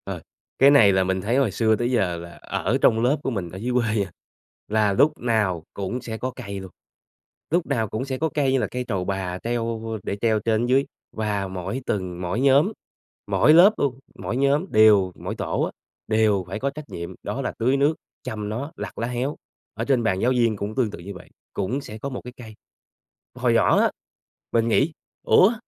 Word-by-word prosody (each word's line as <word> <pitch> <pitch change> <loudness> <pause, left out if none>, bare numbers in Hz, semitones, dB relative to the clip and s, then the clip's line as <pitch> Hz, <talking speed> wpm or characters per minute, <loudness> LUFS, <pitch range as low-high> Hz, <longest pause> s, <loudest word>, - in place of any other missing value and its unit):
Ờ, - - -5 0.4
cái 140 +1 +7
này 115 -9 +7
là 95 0 +3
mình 95 0 -1
thấy 115 +7 0
hồi 135 -7 +2
xưa 110 +2 +2
tới 120 +3 -1
giờ 95 -8 +1
là 85 +1 -8
ở - - -1
trong 110 - +4
lớp 135 +5 +3
của - - 0
mình 95 -7 -3
ở 90 - -9
dưới 120 +5 -2
quê 120 -2 +2
nha, 100 -3 -1 0.6
là 105 -1 +2
lúc 145 +10 +4
nào 105 -8 0
cũng 100 +6 -3
sẽ 115 -2 -5
có 130 - -2
cây 100 -6 -6
luôn. 95 -1 -9 0.8
Lúc 170 +2 +1
nào 115 -6 0
cũng 110 +5 -3
sẽ 130 -1 -3
có 160 +4 0
cây 140 -3 +2
như 135 - +3
là - - 0
cây 125 0 -4
trầu 95 -5 -2
bà 95 -2 -2
treo 115 -1 -1 0.2
để - - -2
treo 110 -2 +2
trên 110 +2 +1
dưới 130 +3 +3 0.3
và 105 -3 -2
mỗi 95 +7 -4
tầng, 90 -3 -3
mỗi 90 +5 -2
nhóm, 140 +8 +4 0.6
mỗi 155 - +4
lớp 185 +6 +8
luôn, 135 -3 -1 0.2
mỗi 120 - -4
nhóm 140 +5 +2
đều 105 -4 +6
mỗi - - -5
tổ - - -2
á - - -1 0.4
đều 110 -3 +2
phải 95 +4 -5
có 140 - 0
trách 150 +2 -8
nhiệm, 85 0 -6
đó - - -3
là - - -3
tưới 130 +4 +2
nước, 145 +3 +3 0.3
chăm 105 -1 -4
nó, 130 +8 -4
lặt - - -6
lá 115 - -2
héo, 125 +4 -2 0.4
ở 115 +2 -3
trên 130 -3 +2
bàn 95 -4 +1
giáo 125 - +3
viên 120 -3 +2
cũng 100 +2 -5
tương 120 -5 +1
tự - - -8
như 95 +4 -8
vậy, 90 - -13 0.2
cũng 125 +9 -2
sẽ 110 -5 -9
có 140 +5 -5
một 130 - -6
cái 125 - -9
cây. 110 -3 -11 0.8
Hồi - - +1
nhỏ - - +4
á, - - +3 0.6
mình 115 0 +2
nghĩ 135 +7 +3 0.3
"Ủa? 200 +6 +5
115 Hz, 220 wpm, -24 LUFS, 100-130 Hz, 0.8 s, lớp